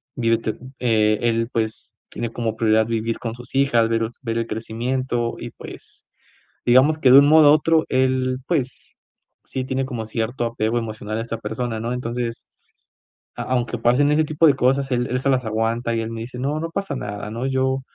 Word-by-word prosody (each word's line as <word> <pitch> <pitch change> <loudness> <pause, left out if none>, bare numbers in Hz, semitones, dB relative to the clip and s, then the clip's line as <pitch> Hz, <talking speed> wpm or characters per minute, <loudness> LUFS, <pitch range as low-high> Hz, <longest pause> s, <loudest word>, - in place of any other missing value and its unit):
vive 115 -2 +2
te 110 -1 -4 0.2
eh, 110 -3 +2
él, 115 0 +1
pues, 110 -2 -3 0.2
tiene 115 -1 -4
como 115 -1 -3
prioridad 110 -1 +3
vivir 115 0 -2
con 115 -2 -4
sus 125 +2 -12
hijas, 120 -5 +3
ver 115 0 +1 0.2
ver 115 -1 -2
el 115 - -2
crecimiento 120 +2 -2
y, - - -7
pues, - - -12 0.6
digamos 130 +6 +5
que 130 -4 +4
de 135 - +10
un 140 - +5
modo 155 -1 +7
u - - +7
otro 160 +1 +3
él, 130 0 +1
pues, 135 -7 -2 0.5
sí 130 - -4
tiene 130 +1 -2
como 115 -4 -5
cierto 115 +2 -2
apego 115 0 -1
emocional 110 -2 -4
a - - -1
esta 115 0 -4
persona, 110 +1 -4
¿no?, 120 +2 -3
entonces, 120 -1 -4 0.9
a - - -4
aunque 125 -1 -1
pasen 125 +5 +3
ese 155 +1 +3
tipo 155 +2 +2
de 140 - +6
cosas, 135 +1 +1
él 125 0 +1
él 125 - 0
se 140 - 0
las 130 -2 +1
aguanta, 115 +2 -1
y 115 - 0
él 115 0 -4
me 115 - -5
dice 125 +2 -7
no 145 +4 -1
no 165 +1 -3
pasa 195 -4 -3
nada, 105 -2 -5
¿no?, 115 +3 -4
yo 130 0 0
120 Hz, 200 wpm, -22 LUFS, 115-130 Hz, 0.9 s, de